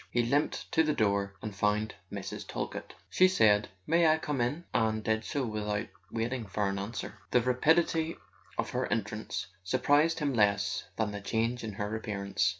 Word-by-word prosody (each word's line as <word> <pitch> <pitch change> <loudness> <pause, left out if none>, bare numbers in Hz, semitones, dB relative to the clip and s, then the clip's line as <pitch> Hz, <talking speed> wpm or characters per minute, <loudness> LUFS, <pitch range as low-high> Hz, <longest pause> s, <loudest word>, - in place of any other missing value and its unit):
He 120 - +2
limped 140 +5 0
to 160 - +4
the 155 -2 +1
door, 100 -2 +1
and 105 -2 -5
found 105 +2 +1 0.2
Mrs. - - -5
Talkett. - - -5 0.2
She 185 - +6
said: 105 - +4 0.2
"May 170 +1 +4
I 155 0 +5
come 145 -4 -2
in?" 140 +8 -1
and 110 -1 +1
did 110 0 +1
so 140 +2 -1
without 105 -1 -2 0.2
waiting 115 0 -2
for 100 +2 0
his 100 - -3
answer. 105 +4 -5
The 125 - +4
rapidity 160 +6 +2 0.4
of - - -1
her - - -1
entrance - - -2 0.2
surprised 145 - +3
him 145 -3 0
less 100 -3 +2
than 110 -2 0
the 105 0 -5
change 115 +4 -1
in 110 -2 -4
her 105 +2 -3
appearance. 100 -2 0
110 Hz, 175 wpm, -30 LUFS, 105-145 Hz, 0.4 s, She